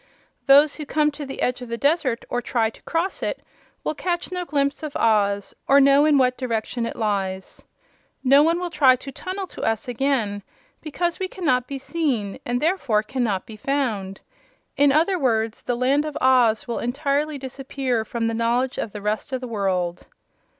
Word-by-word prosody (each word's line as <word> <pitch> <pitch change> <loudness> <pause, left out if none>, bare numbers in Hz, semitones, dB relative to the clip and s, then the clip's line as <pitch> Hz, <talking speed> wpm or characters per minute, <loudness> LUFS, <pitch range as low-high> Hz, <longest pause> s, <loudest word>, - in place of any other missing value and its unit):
Those 285 +2 +6
who 305 - -6
come 300 +1 +2
to 285 -1 -7
the 270 - -4
edge 250 0 0
of 245 - -8
the 235 - -3
desert, 280 -3 +1
or 245 - -2
try 230 -2 0
to - - -18
cross 340 +3 -2
it, - - -3 0.4
will - - -1
catch 345 +3 -3
no 360 -1 -3
glimpse 280 -2 0
of 305 -2 -6
Oz, 200 -3 +1
or 280 +1 +6
know 280 +1 +5
in 300 -2 +4
what 255 -1 +2
direction 230 -1 -2
it - - -6
lies. 195 -3 -3 0.6
No 275 +2 +6
one 330 +3 +2
will 355 -1 -4
try 275 -5 +5
to 275 +2 -9
tunnel 375 +7 -5
to - - -10
us 225 +3 -1
again 240 -5 0 0.4
because 340 +3 -2
we 380 - -1
cannot 255 -10 0
be 275 - -4
seen 265 -9 -2
and 245 0 0
therefore 275 - +1
cannot 220 -5 -2
be 220 - -10
found. 215 -7 -2 0.5
In 285 0 +4
other 335 +6 +2
words, 225 -5 0
the 245 - -2
Land 270 +4 +2
of 305 - -4
Oz 250 -4 +3
will 235 - -2
entirely 285 +4 -1
disappear 265 -2 -3
from 230 +1 -3
the 230 - 0
knowledge 240 +3 0
of 210 - -4
the 210 -1 -7
rest 210 +5 -2
of 260 - -1
the 255 - -6
world." 185 -5 -2
260 Hz, 190 wpm, -23 LUFS, 225-290 Hz, 0.6 s, Those